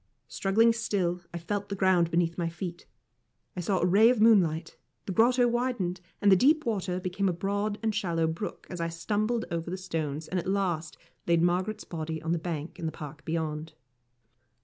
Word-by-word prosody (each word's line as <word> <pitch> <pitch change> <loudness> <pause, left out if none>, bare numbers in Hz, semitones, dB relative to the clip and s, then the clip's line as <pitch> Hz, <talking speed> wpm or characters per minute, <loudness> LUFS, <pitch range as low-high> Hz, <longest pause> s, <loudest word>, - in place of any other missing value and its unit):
Struggling 225 +4 +3
still, 190 -6 -1
I 170 - -5
felt 200 +4 -3
the 200 - -2
ground 185 -3 +3
beneath 170 0 +1
my 170 -2 -1
feet, 175 0 -7 0.7
I - - -4
saw 185 +2 0
a - - +2
ray 205 +6 +6
of 250 -3 +2
moonlight 175 -8 +4 0.3
the - - -3
grotto 245 +5 +4
widened, 235 -7 -1 0.2
and 205 - +6
the - - +9
deep 300 - +4
water 185 -5 -1
became 185 +1 -1
a - - 0
broad 205 +4 -1
and 220 -1 +1
shallow 170 -5 0
brook 160 +6 -4
as 180 -2 -4
I 165 - -1
stumbled 215 +7 -1
over 170 0 -3
the 185 - -3
stones 160 -5 -3
and 185 - -1
at 175 - -5
last 180 -5 -1 0.3
laid 170 -1 +3
Margaret's 185 +5 0
body 160 -1 -4
on 160 +1 -3
the 170 - +1
bank 160 -2 -5
in 165 - -2
the - - -2
park 150 0 -9
beyond. 160 -1 -3
180 Hz, 195 wpm, -28 LUFS, 165-205 Hz, 0.7 s, the